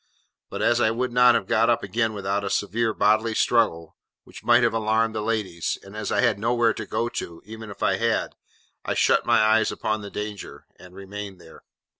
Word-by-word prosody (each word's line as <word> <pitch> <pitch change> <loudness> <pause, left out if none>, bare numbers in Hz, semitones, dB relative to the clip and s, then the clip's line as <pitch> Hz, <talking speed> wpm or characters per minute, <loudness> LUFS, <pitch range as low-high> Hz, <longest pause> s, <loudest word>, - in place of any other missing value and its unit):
But - - -4
as 120 0 +3
I 110 - +4
could 125 +2 -2
not 125 0 +5
have 100 - 0
got 115 +4 +2
up 120 - +1
again 110 +3 -1
without 100 0 -2
a 100 - -3
severe 105 +4 0
bodily 110 +2 +1
struggle, 95 -11 +1 0.3
which - - -13
might - - +4
have - - +2
alarmed 110 0 +1
the 110 - -3
ladies; 105 -6 -2
and 100 +2 -13
as 105 -1 -4
I 100 - +2
had - - +2
nowhere 115 0 +2
to 110 -1 -7
go 115 - -1
to, 85 -7 -6
even 110 +1 -9
if 100 - -8
I - - +2
had; - - 0 0.5
I - - -2
shut - - +2
my - - +4
eyes 110 0 +3
upon 110 0 -2
the 100 - -8
danger, 105 -1 -7
and 90 0 -15
remained 100 0 -8
there. 80 -2 -15
110 Hz, 210 wpm, -24 LUFS, 100-115 Hz, 0.5 s, not